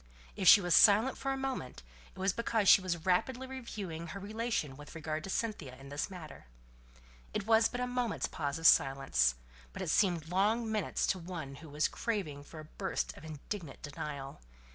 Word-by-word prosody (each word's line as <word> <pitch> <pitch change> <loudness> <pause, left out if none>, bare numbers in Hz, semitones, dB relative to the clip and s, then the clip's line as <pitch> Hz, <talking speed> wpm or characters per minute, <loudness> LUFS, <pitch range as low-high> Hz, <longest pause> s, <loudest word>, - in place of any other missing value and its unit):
If 190 - -1
she 205 - +10
was 175 -2 +1
silent 220 +5 +6
for 270 - -3
a 270 - -1
moment, 265 - -4 0.3
it - - -20
was 190 0 +1
because 225 -3 0
she 195 - +8
was 170 -3 -3
rapidly 240 +8 +1
reviewing 210 -11 -6
her 200 +5 -7
relation 215 - -2
with 145 +3 -12
regard 155 -1 -4
to - - -7
Cynthia 190 - -3
in 135 +1 -12
the 145 +1 -2
matter. 170 - -10 0.9
It 205 - -1
was 225 0 +4
but 245 - -5
a - - +1
moment's 245 -3 -1
pause 145 -4 -3
of 165 - -7
silence; 135 - +4 0.4
but - - -5
it - - -1
seemed 175 -6 +2
long 215 +5 +1
minutes 215 -2 0
to 190 - 0
one 165 -6 -7
who 160 0 -12
was 150 +2 +1
craving 175 -11 -3
for 160 - -11
a 155 - -9
burst 190 +4 -3
of - - -13
indignant 160 +1 -7
denial. 140 - -6
180 Hz, 190 wpm, -32 LUFS, 150-220 Hz, 0.9 s, she